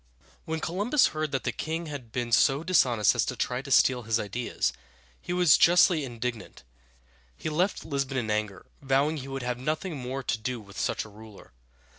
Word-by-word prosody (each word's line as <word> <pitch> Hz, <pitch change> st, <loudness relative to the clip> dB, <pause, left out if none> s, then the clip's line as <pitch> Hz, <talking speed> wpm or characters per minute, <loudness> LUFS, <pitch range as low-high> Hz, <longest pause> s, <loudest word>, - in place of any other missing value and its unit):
When 160 Hz, 0 st, -3 dB
Columbus 205 Hz, -, +2 dB
heard 155 Hz, -1 st, -2 dB
that 135 Hz, -, -2 dB
the -, -, -1 dB
king 165 Hz, +2 st, -4 dB
had 140 Hz, -7 st, -8 dB
been 120 Hz, 0 st, -3 dB
so 135 Hz, +5 st, +4 dB
dishonest 125 Hz, -, +3 dB
as -, -, +1 dB
to -, -, -3 dB
try 125 Hz, 0 st, -2 dB
to 140 Hz, -, -10 dB
steal 130 Hz, -2 st, +4 dB
his 115 Hz, 0 st, 0 dB
ideas, 105 Hz, -, -2 dB, 0.5 s
he -, -, -6 dB
was 180 Hz, -5 st, +5 dB
justly 175 Hz, -2 st, +5 dB
indignant. 120 Hz, -2 st, -6 dB, 0.7 s
He -, -, -4 dB
left 180 Hz, +6 st, 0 dB
Lisbon 140 Hz, -3 st, -2 dB
in 110 Hz, -4 st, -1 dB
anger, 105 Hz, -3 st, -2 dB, 0.2 s
vowing 140 Hz, +3 st, +1 dB
he 135 Hz, -2 st, -7 dB
would 135 Hz, -1 st, -5 dB
have 125 Hz, 0 st, -3 dB
nothing 155 Hz, +6 st, -2 dB
more 130 Hz, +1 st, -5 dB
to 115 Hz, -, -1 dB
do 125 Hz, +2 st, -3 dB
with 100 Hz, -2 st, -11 dB
such -, -, -1 dB
a -, -, -12 dB
ruler. 105 Hz, 0 st, -14 dB
135 Hz, 190 wpm, -27 LUFS, 115-155 Hz, 0.7 s, was